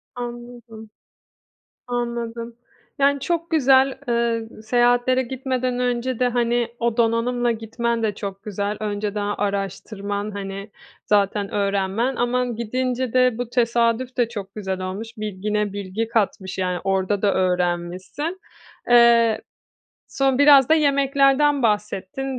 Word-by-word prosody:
Anladım. 240 -2 -8 1.0
Anladım. 235 -1 -4 0.4
Yani, 280 0 +3
çok 335 +3 -2
güzel. 270 -3 +4
Eee, 235 -1 0
seyahatlere 245 +2 +2
gitmeden 255 0 -2
önce 245 0 -1
de, 250 - +3
hani, 240 -1 +1
o 235 0 0
donanımla 235 +1 +1
gitmen 230 +1 -2
de 210 -2 0
çok 195 -1 -6
güzel. 205 0 -3
Önceden 205 -1 -2
araştırman, 200 +1 -3
hani, 195 0 -6 0.3
zaten 205 0 +1
öğrenmen 200 +5 0
ama 250 +1 0
gidince 250 +1 -2
de 255 -2 +3
bu 245 -1 -4
tesadüf 235 +1 +1
de 235 -2 +2
çok 200 -3 -7
güzel 190 -3 -4
olmuş. 205 +5 -6
Bilgine 210 0 -2
bilgi 200 +3 -3
katmış. 200 -4 -1
Yani 180 -1 -1
orada 195 +1 0
da 205 -2 +2
öğrenmişsin. 180 - -1 0.5
Eee, 235 -2 +5 0.7
son 270 -1 +1
biraz 285 -2 +7
da 320 - +6
yemeklerden 280 -1 +3
bahsettin. 210 +4 -1
230 Hz, 120 wpm, -22 LUFS, 205-250 Hz, 1.0 s, biraz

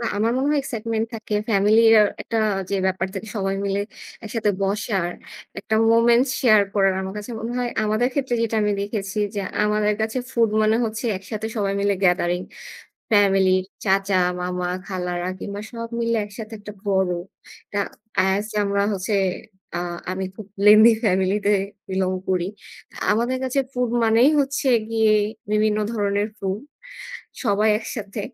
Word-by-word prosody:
আমার 220 +3 +1
মনে 270 - 0
হয় 295 - +2
excitement 225 -2 -2
থাকে 220 -1 -5 0.2
family 210 +2 +4 0.2
র - - +8 0.2
একটা 230 - -3 0.3
যে 200 - 0
ব্যাপার 190 0 0
থেকে 205 +3 -6
সবাই 195 -1 -1
মিলে 200 +1 0 0.4
একসাথে 220 -1 -1
বসার 195 -2 0 0.5
একটা 220 - -2 0.2
moment 235 +2 +5
share 215 -5 +5
করার। 195 -2 +3
আমার 190 +1 -5
কাছে 210 +3 -7
মনে 230 +2 -4
হয় 245 -1 -1
আমাদের 215 +3 +1
ক্ষেত্রে 265 -4 0
যেটা 225 -1 -1
আমি 210 0 +1
দেখেছি 200 0 -3 0.2
যে - - -1 0.2
আমাদের 210 0 +2
কাছে 220 +3 -1
food 230 -3 +2
মানে 215 +1 +3
হচ্ছে 220 +2 -4
একসাথে 215 +3 -5
সবাই 200 -2 0
মিলে 200 0 +2
gathering। 180 0 +2 0.7
Family, 195 -2 +4 0.3
চাচা, 195 0 +2 0.3
মামা, 180 0 -2 0.2
খালারা 180 -2 -3
কিংবা 200 0 -5
সব 230 -1 -6
মিলে 230 0 +1
একসাথে 215 +2 -9
একটা 210 0 -9
বড় 190 -2 +2 0.6
এটা 205 - -3 0.6
as 210 +2 -2 0.2
আমরা 200 0 0
হচ্ছে, 195 +2 -2 0.6
আ - - 0 0.3
আমি 190 +1 -3
খুব 215 - -9 0.2
lengthy 215 +2 +9
family 190 -1 +2
তে 205 - +4 0.4
belong 190 0 0
করি। 180 -2 +1 0.7
আমাদের 240 +4 +1
কাছে 260 +1 0
food 250 -1 0
মানেই 225 +5 +5
হচ্ছে 275 0 0 0.2
গিয়ে 220 -1 +3 0.4
বিভিন্ন 215 0 +2
ধরনের 205 -1 0
food, 195 +1 -2 0.8
সবাই 215 -1 +2
একসাথে। 210 -2 -6
210 Hz, 150 wpm, -22 LUFS, 195-225 Hz, 0.8 s, lengthy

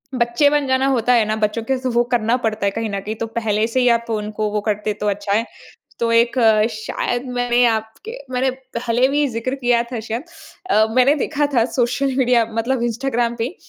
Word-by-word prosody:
बच्चे 240 +4 +2
बन 295 -1 0
जाना 260 0 +2
होता 250 -2 +2
है 230 -3 +4
ना? 215 +1 -1
बच्चों 215 +1 -1
के 265 +3 -1
स 255 - -10
वो 240 - +4
करना 235 0 +2
पड़ता 220 -4 -2
है 200 - +2
कहीं 225 +1 -3
न 200 -1 -3
कहीं। 210 +3 -5
तो 225 - -4
पहले 220 -2 -1
से 235 +3 -1
ही 250 - +3
आप 235 0 +2
उनको 215 -1 -2
वो 210 0 -1
करते 210 0 -1
तो 210 - 0
अच्छा 200 0 -2
है। 225 +3 +1 0.5
तो 230 0 0
एक, 235 +2 +3 0.4
शायद 240 +3 -3
मैंने 245 0 +2
आपके 225 - -3
मैंने 260 +1 +1 0.3
पहले 240 +2 +1
भी 290 +1 +1
ज़िक्र 250 +2 -3
किया 245 -3 +2
था 240 - -3
शायद। 225 +5 -4 0.5
अ, 220 - +4
मैंने 255 +3 +5
देखा 295 0 -1
था 235 -3 +4
सोशल 255 +2 0
मीडिया 245 -3 +3
मतलब 235 +2 -1
इंस्टाग्राम 240 0 -1
पे, 240 +9 -3
235 Hz, 210 wpm, -20 LUFS, 220-255 Hz, 0.5 s, मैंने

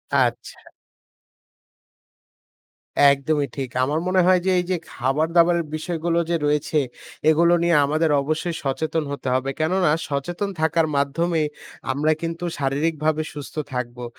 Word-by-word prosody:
আচ্ছা। - - -1 2.4
একদমই 140 +1 0
ঠিক। 135 -3 -4
আমার 145 +4 0
মনে 185 0 +3
হয় 185 -1 +5
যে 190 - +3
এই - - 0
যে 180 - +1 0.2
খাবার-দাবারের 165 +6 +2
বিষয়গুলো 170 +1 -1
যে 170 - +2
রয়েছে 150 +1 +1 0.5
এগুলো 170 +2 +4
নিয়ে 170 0 +3
আমাদের 155 +2 +1
অবশ্যই 155 +4 -2
সচেতন 155 +3 -1
হতে 140 -1 -5
হবে, 130 +1 0
কেননা 175 +1 +2 0.2
সচেতন 175 +8 -2
থাকার 160 0 +2
মাধ্যমেই 155 +3 0 0.4
আমরা 150 +4 +1
কিন্তু 165 +1 -4
শারীরিকভাবে 155 +2 0
সুস্থ 145 -2 -9 0.2
থাকবো। 125 -1 -4
155 Hz, 125 wpm, -22 LUFS, 140-170 Hz, 2.4 s, হয়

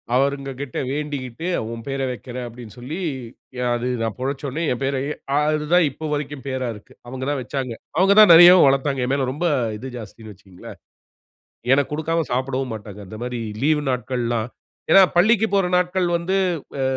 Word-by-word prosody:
அவுங்ககிட்ட 135 0 -2
வேண்டிக்கிட்டு 145 0 -4 0.2
"ஒம் 115 0 -7
பேர 135 0 -3
வைக்கிறேன்" 125 0 -7
அப்படினு 120 -2 -11
சொல்லி, 135 +8 -6 0.6
ய - - -4 0.2
அது 120 +1 -3
நான் 115 -3 -2
பொழச்சொடனே 135 +3 -3
என் 125 - -3
பேரயே 135 +1 -1 0.3
அது 150 0 +1
தான் 180 -1 +6
இப்ப 155 +4 -7
வரைக்கும் 145 -2 -4
பேரா 130 -1 -2
இருக்கு. 105 - -15
அவங்க 130 +1 -6
தான் 145 -1 -1
வச்சாங்க. 130 -1 -4 0.2
அவங்க 195 +3 +5
தான் 210 -4 +9
நிறையவும் 175 +1 +9
வளர்த்தாங்க. 135 -1 +1
என்மேல 135 0 0
ரொம்ப 150 +6 -3 0.3
இது 130 +4 -7
ஜாஸ்தினு 110 -1 -10
வச்சுக்கங்களேன். 95 -2 -13 0.9
எனக்கு 140 +1 +1
குடுக்காம 165 +1 -1
சாப்பிடவும் 130 0 -2
மாட்டாங்க. 105 -1 -10
இந்த 110 - -9
மாதிரி 125 -1 -4 0.2
லீவ் 150 0 +3
நாட்கள்லாம் 120 -2 -2 0.4
ஏன்னா 195 - +9
பள்ளிக்குப் 215 +3 +3
போற 195 -2 +3
நாட்கள் 180 0 0
வந்து, 180 +3 -1 0.4
ஆ - - 0
135 Hz, 160 wpm, -22 LUFS, 125-155 Hz, 0.9 s, தான்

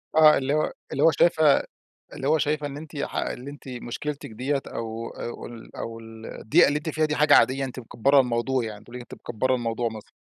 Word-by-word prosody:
آه، 155 -1 +7
اللي 135 +2 0
هو 155 0 +1 0.2
اللي - - 0
هو 165 - +7
شايفة 155 -4 +4 0.5
اللي 135 - -3
هو 160 +1 +4
شايفة 150 0 0
إن 140 -1 -6
أنتِ 155 0 -9
ح - - -3
اللي 130 +3 -3
أنتِ 145 -1 -12
مشكلتِك 130 +3 -5
دِيّة 135 +5 -2
أو 115 0 -5
أو 120 - -7
ال 115 -1 -11
أو 115 0 -5
ال 110 0 -11
الضيقة 110 - +3
اللي 145 - +1
أنتِ 155 - -7
فيها 155 0 +1
دي 155 0 0
حاجة 150 0 +5
عادية، 135 +1 +4
أنتِ 130 -1 -6
مكبرة 135 +4 +3
الموضوع 125 0 0
يعني، 105 -1 -7
تقول 120 +2 -10
لِك 125 - -6
أنتِ - - -11
مكبرة 130 +3 -1
الموضوع 120 -1 -1
مثلًا. 110 -2 -10
130 Hz, 225 wpm, -25 LUFS, 115-145 Hz, 0.5 s, آه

